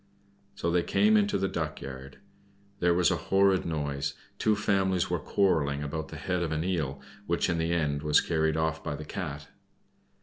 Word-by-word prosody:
So 85 - -1
they 90 0 +3
came 215 - +3
into 205 -1 +3
the 95 - 0
duck 80 -4 -3
yard. 65 0 -9 0.6
There 90 -1 +3
was 90 0 +3
a - - +1
horrid 95 -2 +3
noise; 75 -3 -2 0.2
two 110 -1 +3
families 95 -3 +1
were - - +1
quarreling 75 -7 +1
about 80 +2 -4
the - - -9
head 90 -1 -2
of 85 -2 -1
an 80 +1 -1
eel, 80 -7 -1 0.3
which 85 +1 +1
in 85 - 0
the 80 +1 0
end 75 -4 0
was 75 0 +4
carried 80 -1 0
off 80 0 -1
by 75 -2 -3
the 75 +1 -7
Cat. 75 -5 -6
80 Hz, 190 wpm, -28 LUFS, 75-95 Hz, 0.6 s, was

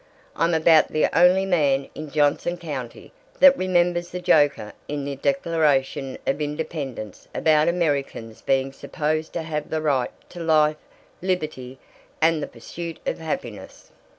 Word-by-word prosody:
I'm 165 +1 +1
about 160 0 +5
the 155 - 0
only 180 +3 +5
man 145 -7 +1
in 155 -1 -7
Johnson 150 +4 +1
County 145 - -7 0.3
that 275 -1 +8
remembers 175 -3 +1
the 180 - -5
joker 145 -11 +2
in 145 -1 -4
the 140 -1 -4
Declaration 145 - 0
of 135 - -1
Independence 145 - -5
about 155 0 +3
Americans 145 -9 -1
being 135 0 0
supposed 155 +3 -3
to 170 - -3
have 150 -2 -4
the 160 - -1
right 140 -5 +1 0.2
to 175 - -9
'life, 155 -2 +3 0.4
liberty, 155 -8 -3 0.4
and 160 -1 +3
the - - -3
pursuit 165 +8 -8
of - - -2
happiness.' 125 -9 -6
155 Hz, 140 wpm, -23 LUFS, 140-170 Hz, 0.4 s, that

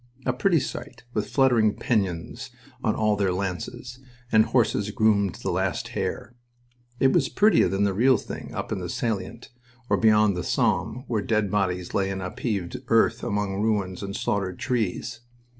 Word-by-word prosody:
A 130 - +1
pretty 165 +6 +2
sight, 120 -2 -7
with 105 -1 -2
fluttering 120 -6 +3
pennons 105 +3 -2 0.3
on 110 - +1
all 105 -1 +2
their 100 -2 +1
lances, 100 +7 -4 0.3
and 110 0 +5
horses 105 -4 +1
groomed 100 -3 +2
to - - -13
the - - 0
last - - -1
hair. 120 - -4 0.7
It 135 - +4
was - - +2
prettier 210 -4 +4
than 95 +1 0
the 100 -1 +2
real 125 +5 +4
thing - - -8
up - - -4
in - - -1
the - - -5
salient 115 +1 -3 0.4
or - - +4
beyond 105 -3 +4
the 90 - -3
Somme, 125 - 0
where 110 -4 0
dead 105 -2 0
bodies 90 -3 -1
lay 95 -1 +1
in 95 -1 -3
upheaved 95 -1 -3
earth - - +3
among 100 -1 -1
ruins 100 -4 0
and 100 0 -5
slaughtered 95 -3 -1
trees. 115 -2 -2
105 Hz, 170 wpm, -25 LUFS, 95-120 Hz, 0.7 s, and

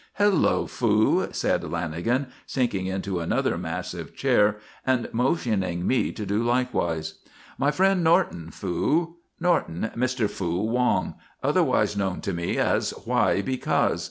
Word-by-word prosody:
"Hello, 205 -3 +3
Fu," 110 -2 +2
said - - 0
Lanagan, 85 - -1 0.2
sinking 115 -8 -1
into 95 -1 -2
another 85 - 0
massive - - -5
chair 105 0 +3 0.3
and 130 -2 +1
motioning 110 - 0
me 130 - +1
to 105 - -6
do 100 +3 0
likewise. 120 -10 -1 0.4
"My 140 - +3
friend 190 +2 +2
Norton, 160 - +2
Fu. 155 - -1 0.2
Norton, 110 - 0
Mr. 125 -2 0
Fu 90 -2 -2
Wong, 125 +2 +1 0.3
otherwise - - +2
known 95 -2 -1
to 100 -4 -3
me 85 0 -2
as - - +1
Why 100 - +2
Because. 130 -1 0
110 Hz, 130 wpm, -25 LUFS, 95-130 Hz, 0.4 s, Hello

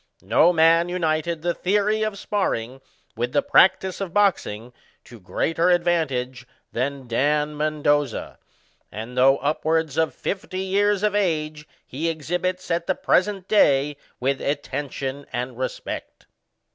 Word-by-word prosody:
No 115 - +4
man 165 +1 +4
united 165 -2 -1
the 175 0 +1
theory 210 +4 +1
of 215 -2 -1
sparring 135 - -2 0.3
with 120 +2 -2
the - - +2
practice 190 -8 +3
of 190 -2 -5
boxing 125 - +1 0.3
to 120 - -14
greater 165 - 0
advantage 135 -8 0 0.2
than 135 +1 -3
Dan 150 +5 +1
Mbndoza; 145 -3 0 0.5
and, 110 +5 -7
though 135 +2 +5
upwards 155 +1 -1
of 160 -1 +1
fifty 190 -1 -4
years 200 +1 +1
of 210 -1 +2
age, 155 -6 -1 0.2
he 155 +6 -3
exhibits, 180 +3 -3
at 170 0 -1
the 185 - +1
present 195 0 +1
day, 145 -8 +3 0.2
with 135 +1 -1
attention 140 -1 -4
and 125 +1 -4
respect. 130 - -5
155 Hz, 130 wpm, -23 LUFS, 135-185 Hz, 0.5 s, though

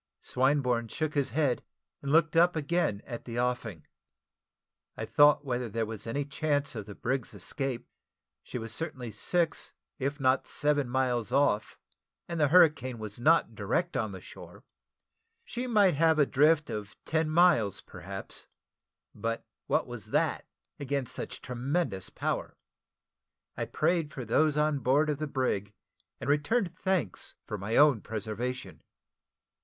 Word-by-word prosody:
Swinburne 125 -3 +1
shook 155 +5 -2
his 140 -2 +1
head, 140 -4 +1 0.4
and 140 - -3
looked 165 +1 +4
up 175 +2 +5
again 155 - 0
at 120 -3 -7
the 120 0 -4
offing. 120 -9 -2 1.1
I - - -3
thought 145 0 +5
whether 125 -2 -2
there 115 +1 -1
was 110 0 -6
any 140 +5 -1
chance 145 0 0
of 110 -4 -6
the 100 - -8
brig's 125 -3 -2
escape. 125 +6 -3 0.5
She - - -6
was 115 -1 -3
certainly 130 -7 -4
six, 165 - -1 0.3
if 140 +2 -2
not 130 0 +2
seven 145 -3 +1
miles 125 -2 0
off, 135 -6 +2 0.5
and 170 -1 -3
the 150 - +4
hurricane 145 -6 +4
was 110 0 -7
not 165 +6 +4
direct - - -1
on - - -1
the - - -7
shore. - - -12 0.8
She 245 +1 -4
might 205 -6 +4
have 160 +2 +3
a 145 - +5
drift 150 +3 +3
of 105 -1 -5
ten 160 -1 +1
miles, 155 - +4
perhaps; - - -9 0.7
but 115 +2 -3 0.2
what - - +2
was - - -8
that - - 0 0.3
against 140 -2 -2
such - - -6
tremendous 125 - -2
power? - - -3 1.0
I - - -2
prayed 165 -1 0
for 130 -3 -6
those 150 +6 +2
on 150 -1 +2
board 145 +4 +3
of 145 - -3
the 155 - -2
brig, 105 -8 -1 0.4
and - - -6
returned 170 +6 +1
thanks 185 - -1
for 105 - -5
my 105 +4 -2
own 145 -7 +6
preservation. 115 +4 -4
140 Hz, 150 wpm, -29 LUFS, 120-155 Hz, 1.1 s, own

